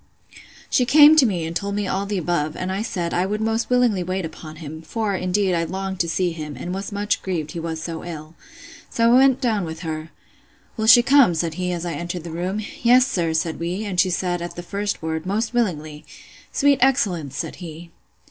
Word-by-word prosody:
She 250 - +2
came 295 +4 +7
to 270 -5 +6
me, 175 -6 -2
and 165 +1 -5
told 200 +3 -2
me 205 0 -1
all 195 +2 -2
the 205 -1 -2
above; 160 -3 -1
and 185 0 -3
I 195 +2 -2
said, 175 -6 -3
I 180 +2 +1
would 210 +2 -2
most 225 +1 -1
willingly 245 -6 +2
wait 185 0 -2
upon 155 -1 -9
him; 155 0 -8
for, 210 +5 -2
indeed, 185 +1 0
I 165 -1 +1
longed 190 +2 -4
to 170 -3 0
see 180 +2 0
him, 150 -3 -7
and 180 - -5
was 195 +2 -5
much 205 +1 -1
grieved 165 -5 -3
he 170 - -5
was 165 -1 -4
so 165 -1 -5
ill.—So 230 - -6
I - - +7
went 265 0 +5
down 220 -6 +1
with 160 -1 -6
her. 155 -2 -5 0.7
Will 220 0 -2
she 240 +1 +9
come? 270 -9 +5
said 165 0 -1
he, 180 +2 -2
as 175 -1 -3
I 170 - -3
entered 175 0 -5
the 170 - -7
room. 180 +5 -3 0.2
Yes, 250 +1 +6
sir, 175 -10 -1
said 160 0 -1
we; 180 +5 -3
and 190 -3 -2
she 185 - +4
said, 175 0 -1
at 175 - -6
the 175 - -7
first 200 0 -3
word, 160 +1 -3
Most 220 +4 -1
willingly.—Sweet 195 - -2
excellence! 190 - +1
said - - -4
he. 170 -1 -9
185 Hz, 215 wpm, -22 LUFS, 165-215 Hz, 0.7 s, she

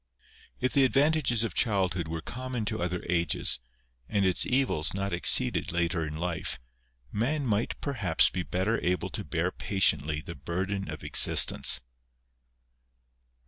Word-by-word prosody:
If 125 +1 -2
the 140 - +4
advantages 135 -3 +2
of 115 - -4
childhood 95 -6 -1
were 80 0 -5
common 125 +3 -6
to 100 - -4
other 90 0 -4
ages, 85 -6 0 0.5
and 100 -2 0
its 90 -1 +2
evils 125 - +1
not 100 0 -3
exceeded 85 - +1
later 85 0 -1
in 75 +1 -7
life, 85 0 -3 0.5
man 135 +7 -2
might 110 -1 -2
perhaps 105 - +2
be 90 - -4
better 95 - -2
able 90 -1 -2
to - - -4
bear - - -2
patiently 80 -6 0
the 85 - -9
burden 95 +7 -5
of 75 -1 -8
existence. 65 - +6
95 Hz, 140 wpm, -27 LUFS, 85-115 Hz, 0.5 s, existence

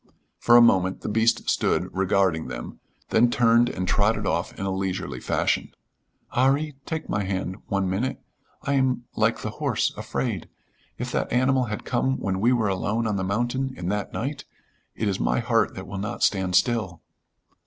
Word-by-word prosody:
For 120 0 +6
a 120 - +8
moment 95 -4 +3
the - - -4
beast 110 +2 +2
stood 90 - +1
regarding 95 -3 +1
them, - - -7 0.3
then 120 +2 +4
turned 120 0 +4
and 90 0 -3
trotted 105 +2 +2
off 85 0 -1
in 95 - -3
a 95 - -1
leisurely 95 -1 -3
fashion. - - 0 0.6
"'Arry, 140 +4 +2
take 160 -1 -3
my 105 - -1
hand 95 -1 -3
one 100 -2 0
minute. 100 +8 -1 0.4
I 140 - 0
am 130 -3 +1
like - - +1
the - - -3
horse, - - +1
afraid. - - -3 0.5
If - - -4
that - - -1
animal 130 +1 +3
had 105 -2 -5
come 130 +2 0
when 95 -1 -2
we 120 +3 +4
were 115 -4 +2
alone 105 +4 -1
on 105 -2 0
the 95 - -1
mountain 120 +7 -1
in 90 0 -3
that 105 0 -2
night 140 +4 -4 0.5
it 110 - -1
is 100 -1 -1
my - - +1
heart 115 -1 +1
that 95 - -7
will 95 +1 -6
not 105 +1 -3
stand 95 -2 +2
still." 105 -7 +1
105 Hz, 180 wpm, -25 LUFS, 95-120 Hz, 0.6 s, a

